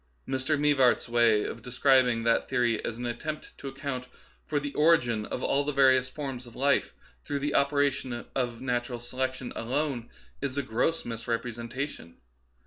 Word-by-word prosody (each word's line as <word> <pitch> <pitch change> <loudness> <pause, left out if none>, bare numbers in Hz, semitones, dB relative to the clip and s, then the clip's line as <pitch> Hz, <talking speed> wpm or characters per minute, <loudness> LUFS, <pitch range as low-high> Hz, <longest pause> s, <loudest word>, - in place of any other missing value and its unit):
Mr. 135 +3 0
Mivart's 140 -4 +3
way 115 -3 +4
of 115 - -5
describing 125 -1 +3
that 115 0 +2
theory 120 -4 +1
as 115 - -3
an 120 - -4
attempt 150 +6 -5
to 140 - -7
account 135 -1 -4 0.4
for 150 - +1
the 145 0 -5
origin 120 -9 +3
of 125 - -4
all 140 - +2
the 150 - -1
various 130 -2 +4
forms 135 -4 -6
of 120 - -14
life 140 +2 +1 0.3
through 145 - -2
the 145 +1 -1
operation 140 -3 +1
of 120 -3 -2
natural 120 -1 -1
selection 130 +1 -3
alone 130 0 -2 0.3
is 140 -1 -3
a 140 - +1
gross 125 +8 0
misrepresentation. 115 - -4
130 Hz, 155 wpm, -28 LUFS, 120-140 Hz, 0.4 s, way